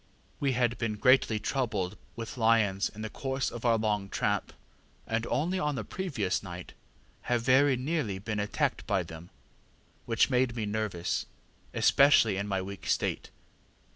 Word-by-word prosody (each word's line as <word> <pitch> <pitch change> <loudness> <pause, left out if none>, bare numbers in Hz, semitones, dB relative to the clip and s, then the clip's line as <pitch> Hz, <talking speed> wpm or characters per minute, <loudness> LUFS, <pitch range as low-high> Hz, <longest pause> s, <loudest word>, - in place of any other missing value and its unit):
We 140 -2 +1
had 120 -1 +1
been 115 -2 -1
greatly 125 0 +4
troubled 105 -5 -1 0.2
with 115 -1 -6
lions 110 -4 +2
in 110 +1 -9
the 110 - -4
course 135 0 -2
of 120 +1 -7
our 115 -1 +4
long 105 -2 -1
tramp, - - -1 0.5
and 115 +1 -1
only 180 +6 0
on 150 -3 0
the - - -3
previous 135 - -2
night 90 -2 -8 0.6
have 120 -1 +1
very 130 +2 +5
nearly 130 - -1
been 105 +2 -3
attacked 105 0 -1
by - - +1
them, 80 +2 -10 0.8
which 115 +3 +2
made 125 -1 +2
me 110 -3 -2
nervous, 105 -5 -2 0.4
especially 140 -7 +5
in 100 +1 -2
my 95 -2 -1
weak 100 0 -8
state. - - -1
115 Hz, 155 wpm, -29 LUFS, 105-130 Hz, 0.8 s, very